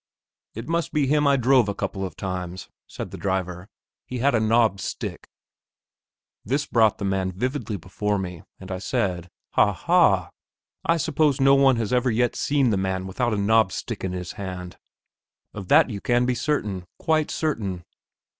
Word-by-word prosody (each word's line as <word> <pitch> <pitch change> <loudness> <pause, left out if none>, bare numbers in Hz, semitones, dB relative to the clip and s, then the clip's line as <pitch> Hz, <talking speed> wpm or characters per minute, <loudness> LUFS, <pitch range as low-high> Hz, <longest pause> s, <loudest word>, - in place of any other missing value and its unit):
"It 115 +3 -6
must 170 0 -1
be 150 -2 +2
him 145 +1 +2
I 140 -1 +4
drove 125 -3 +4
a 100 - -3
couple 100 -1 -3
of 95 - -5
times," 90 -1 -5 0.2
said - - -7
the - - -8
driver; 95 -1 -3 0.4
"he 125 - -4
had 135 +3 +2
a 115 - +3
knobbed 110 -2 +3
stick." - - -5 1.2
This 140 +7 -1
brought 110 -5 +3
the 100 - -4
man 95 -1 0
vividly 125 +2 -3
before 100 +4 -2
me, 90 -3 -5 0.2
and 95 0 -9
I 95 - -3
said, 90 -2 -2 0.2
"Ha, - - +4
ha! - - +3 0.5
I 165 - +2
suppose 150 -2 +1
no 135 0 +5
one 135 -1 +5
has 115 -1 -2
ever 125 0 +2
yet 120 +1 +1
seen 140 -4 +1
the 100 - +1
man 95 0 -2
without 120 +6 -1
a - - -2
knobbed 100 -1 +3
stick 115 +1 -5
in 95 - -2
his 90 -1 -5
hand, 90 -2 -7 0.8
of 100 -3 -7
that 150 - +5
you 100 -2 -5
can 120 0 +2
be 125 - +1
certain, 105 -9 -2
quite 155 -2 +1
certain." 100 - -2
110 Hz, 180 wpm, -24 LUFS, 95-135 Hz, 1.2 s, no